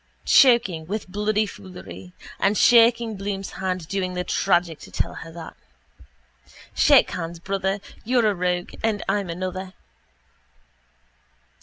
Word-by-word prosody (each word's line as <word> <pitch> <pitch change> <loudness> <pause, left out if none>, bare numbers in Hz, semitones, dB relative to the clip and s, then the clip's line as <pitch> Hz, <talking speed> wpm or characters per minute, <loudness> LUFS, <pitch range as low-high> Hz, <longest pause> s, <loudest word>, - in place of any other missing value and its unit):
Choking 235 -11 +4
with 205 +2 -4
bloody 210 +2 0
foolery. 185 -2 -11 0.3
And 200 +2 +2
shaking 230 -2 +4
Bloom's 195 0 -4
hand 185 -3 -3
doing 185 -1 -3
the 180 - -2
tragic 175 -3 0
to - - -12
tell - - -2
her 165 - -9
that. 165 0 -10 1.2
Shake 285 -3 +5
hands, 170 -2 -5
brother. 195 +2 -2 0.2
You're 245 0 +2
a - - -2
rogue 180 -1 -2
and 220 -2 -1
I'm 200 -3 -1
another. 185 +2 -5
190 Hz, 125 wpm, -23 LUFS, 180-215 Hz, 1.2 s, Shake